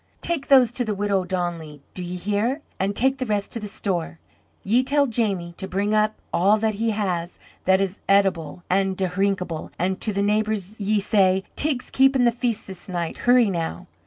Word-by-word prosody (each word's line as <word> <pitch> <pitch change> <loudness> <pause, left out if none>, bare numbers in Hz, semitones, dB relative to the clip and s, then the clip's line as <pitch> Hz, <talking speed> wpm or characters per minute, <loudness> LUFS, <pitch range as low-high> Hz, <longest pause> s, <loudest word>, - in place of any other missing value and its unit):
"Take 330 -5 -2
those 260 -4 +6
to 245 0 -1
the 215 -3 -2
widow 200 -1 +1
O'Donnelly, 175 -5 -4
do 185 - -6
ye 175 +1 -5
hear? 210 - -1 0.2
And 195 +2 -1
take 265 +4 +2
the 255 - -1
rest 205 -2 -1
to 230 - -2
the 210 - -6
store. 180 -5 -3 0.5
Ye 230 +6 +3
tell 280 +2 +3
Jamie 200 -8 -1
to 190 - -5
bring 200 +3 -1
up 215 0 +2 0.2
all 200 +5 +4
that 220 0 0
he 225 +3 -1
has 185 -5 -2 0.3
that 190 0 +4
is 195 0 -2
eatable 185 -4 +1
an' 190 0 +1
dhrinkable; 185 -3 -1
and 185 +2 -1
to 215 - +1
the 200 0 -1
neighbours 215 -1 -1
ye 210 +1 +1
say, 190 -2 +2
'Teig's 285 -4 +1
keepin' 265 -1 +4
the 240 - +5
feast 235 -2 -2
this 190 0 -10
night.' 170 -2 -3
Hurry 245 -4 +5
now!" 165 - -4
200 Hz, 190 wpm, -23 LUFS, 185-225 Hz, 0.5 s, those